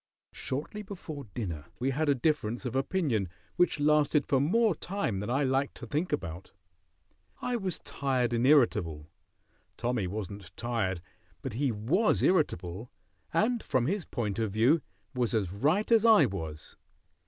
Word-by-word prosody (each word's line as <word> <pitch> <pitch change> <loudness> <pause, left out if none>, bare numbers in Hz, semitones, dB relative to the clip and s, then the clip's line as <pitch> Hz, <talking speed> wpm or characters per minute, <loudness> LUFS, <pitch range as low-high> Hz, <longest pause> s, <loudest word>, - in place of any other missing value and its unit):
Shortly 150 +11 -4
before 175 -8 -7
dinner 95 -9 -5
we 130 +2 0
had 150 +3 0
a 140 - +4
difference 125 -4 0
of 125 0 -3
opinion 135 - 0 0.3
which 180 -3 +2
lasted 150 -1 +3
for 135 - +2
more 210 - +3
time 175 - -2
than 105 +3 -4
I 135 +4 +2
like 135 +1 0
to - - -8
think 155 +5 -2
about. 90 - -4 0.9
I 250 0 -1
was 195 -6 -2
tired 130 -3 -1
and 120 +2 +2
irritable. 85 - +3 0.7
Tommy 120 -5 -1
wasn't 100 -2 -6
tired, 110 -7 -1 0.4
but 135 - -4
he 130 +3 +1
was 135 - +1
irritable, 110 - +1 0.4
and, 235 +1 +2
from 125 -2 0
his 185 +3 -1
point 105 -4 -3
of 110 -2 0
view, 120 +10 +4 0.3
was 125 -2 0
as 100 -5 0
right 155 - +1
as 225 -2 +6
I 225 -2 +7
was. 80 -5 -6
130 Hz, 155 wpm, -30 LUFS, 105-155 Hz, 0.9 s, I